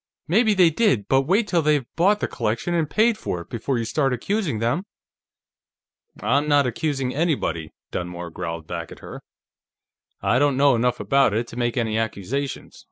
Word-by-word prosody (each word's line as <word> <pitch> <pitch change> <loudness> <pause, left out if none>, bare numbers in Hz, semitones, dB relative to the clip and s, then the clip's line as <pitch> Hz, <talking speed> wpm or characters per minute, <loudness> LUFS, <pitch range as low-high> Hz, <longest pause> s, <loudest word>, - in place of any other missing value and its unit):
Maybe 215 +5 +3
they 180 -3 +5
did, 150 - +1
but 135 0 +2
wait 205 +5 +2
till 175 -4 +2
they've 150 -4 +2
bought 200 +5 +3
the - - 0
collection 115 +11 -2
and 165 -3 0
paid 220 0 +2
for 90 - -3
it, - - -14
before 120 +3 -2
you 115 - -2
start 135 +2 0
accusing 170 - -1
them!" 125 - -1 1.4
"I'm 145 +3 +2
not 145 -2 +4
accusing 135 0 -2
anybody," 140 - -1 0.2
Dunmore 90 -1 -5
growled 85 -2 -5
back - - -6
at - - -12
her. - - -9 1.0
"I 125 - +2
don't 145 -2 +2
know 140 0 +5
enough 120 +1 +1
about 110 +1 +2
it 115 +2 0
to - - -10
make 120 0 -1
any 110 -2 0
accusations. 115 +6 -4
135 Hz, 175 wpm, -23 LUFS, 115-165 Hz, 1.4 s, they